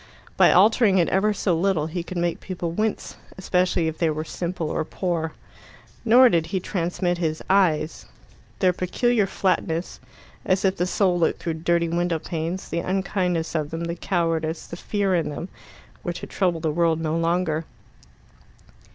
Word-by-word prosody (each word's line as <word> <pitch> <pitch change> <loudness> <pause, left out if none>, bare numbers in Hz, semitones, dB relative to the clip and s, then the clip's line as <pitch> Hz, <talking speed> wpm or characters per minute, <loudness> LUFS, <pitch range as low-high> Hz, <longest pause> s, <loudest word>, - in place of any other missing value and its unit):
By - - +6
altering 205 +1 +5
it 175 - +3
ever 200 +3 +2
so 190 -3 0
little 170 -2 +1
he 165 +3 -3
could 180 +1 -7
make 170 -1 -1
people 175 -3 -4
wince, 215 +5 -2 0.2
especially 180 -2 +1
if 160 0 -4
they 165 - +2
were 155 0 -2
simple 170 -1 -3
or - - -1
poor. 165 -1 -2 0.7
Nor 245 +3 +7
did 165 -8 +1
he 190 +3 -1
transmit 175 -1 -2
his 160 -2 -2
eyes. 160 -5 +2 0.5
Their 185 -2 +3
peculiar 210 +4 +1
flatness, 180 -3 -1 0.4
as 185 +1 +1
if 190 0 +1
the 180 - 0
soul 180 -2 +1
looked 165 - +2
through 165 - -2
dirty 170 0 +2
window 170 0 0
panes, 165 +3 -4
the 170 - -2
unkindness 180 -2 -1
of 155 -3 -1
them, 165 +1 -4
the 170 0 -2
cowardice, 165 -3 -1
the - - -8
fear 200 +1 -1
in 165 -4 +1
them, 160 +5 -6 0.5
were 175 - -2
to - - -7
trouble 180 -4 0
the 160 -1 0
world 165 0 +2
no 160 -1 -1
longer. 165 -1 0
175 Hz, 170 wpm, -24 LUFS, 165-185 Hz, 0.7 s, Nor